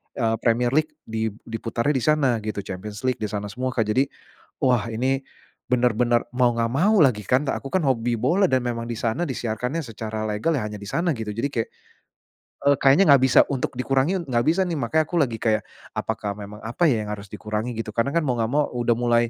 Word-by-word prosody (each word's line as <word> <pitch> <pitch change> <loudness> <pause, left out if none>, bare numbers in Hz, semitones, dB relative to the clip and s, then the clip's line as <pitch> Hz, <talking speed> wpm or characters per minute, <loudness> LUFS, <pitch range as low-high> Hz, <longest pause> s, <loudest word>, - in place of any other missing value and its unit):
eee, 115 -1 +1
Premier 120 +1 +2
League 155 +1 +1
di 110 0 -2 0.2
diputarnya 115 +3 -2
di 135 - +1
sana 135 -4 +2
gitu. 105 -2 -4
Champions 105 +5 -7
League 130 -1 0
di 105 - -1
sana 105 0 -4
semua 130 +1 -3
Kak. 115 - +3
Jadi 130 +6 +1 0.5
wah, 120 -5 +2
ini 130 +4 0 0.5
bener-bener 120 -1 +2
mau 125 -1 +4
enggak 115 -1 0
mau 200 +8 +4
lagi 125 -9 +4
kan, 130 +8 +1
Kak, - - -2
aku 135 - -7
kan 180 -6 +1
hobi 120 -2 +1
bola 180 - +2
dan 130 - +4
memang 115 -1 -3
di 115 - -4
sana 115 +8 -1
disiarkannya 125 +1 -2
secara 110 -1 -4
legal, 110 +9 0
ya 105 - -2
hanya 105 -1 -6
di 100 - -9
sana 170 0 0
gitu 110 -2 -5
jadi 115 +5 -1
kayak 115 -5 -2 1.0
eee, 140 - +6
kayaknya 140 +7 +6
nggak 135 - +5
bisa 130 - +5
untuk 135 - -2
dikurangi 135 +8 +1
enggak 120 -4 +1
bisa 185 +3 +2
nih. 175 - -2
Makanya 155 +5 +1
aku 170 0 0
lagi 120 -5 0
kayak 110 -1 +1 0.3
apakah 100 -1 -3
memang 105 0 -9
apa 150 +8 +2
ya, 110 -4 0
yang 105 - -4
harus 100 -1 -9
dikurangi 110 +2 -4
gitu. 110 -2 -4
Karena 115 +4 +1
kan 170 - +2
mau 125 - +1
nggak 110 - 0
mau 145 +2 +2
udah 120 -1 +1
mulai, 120 -1 +2
120 Hz, 220 wpm, -24 LUFS, 110-135 Hz, 1.0 s, eee